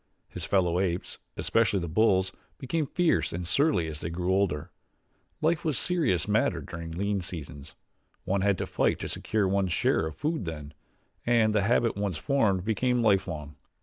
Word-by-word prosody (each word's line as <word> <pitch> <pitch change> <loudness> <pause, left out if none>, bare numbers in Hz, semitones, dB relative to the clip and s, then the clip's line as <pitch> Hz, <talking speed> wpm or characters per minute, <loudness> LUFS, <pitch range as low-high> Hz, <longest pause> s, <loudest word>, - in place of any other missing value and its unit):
His - - -4
fellow 90 -3 +2
apes, 90 -2 -2 0.2
especially 115 -3 +2
the 85 - -4
bulls, 95 +1 +2 0.3
became 145 +2 -2
fierce 175 +1 +1
and 85 +1 -4
surly 135 - +3
as 75 -1 -6
they 80 - -4
grew 90 +2 -1
older. 95 -7 0 0.7
Life 160 +1 +1
was 155 -6 +1
a - - +2
serious 155 - +1
matter - - +2
during 85 -1 -7
lean 100 +4 -1
seasons 80 -5 -8 0.5
one 95 +1 0
had 100 -1 +2
to - - -2
fight - - +1
to - - -3
secure 105 -3 -1
one's 95 -2 +1
share 80 - +1
of 80 - -7
food 155 - -2
then, 75 -3 -6 0.5
and 115 -3 +3
the 105 - +3
habit 115 +2 +2
once 100 -5 -2
formed 100 - +1
became 120 +3 +1
lifelong. 85 -8 0
95 Hz, 175 wpm, -28 LUFS, 85-115 Hz, 0.7 s, surly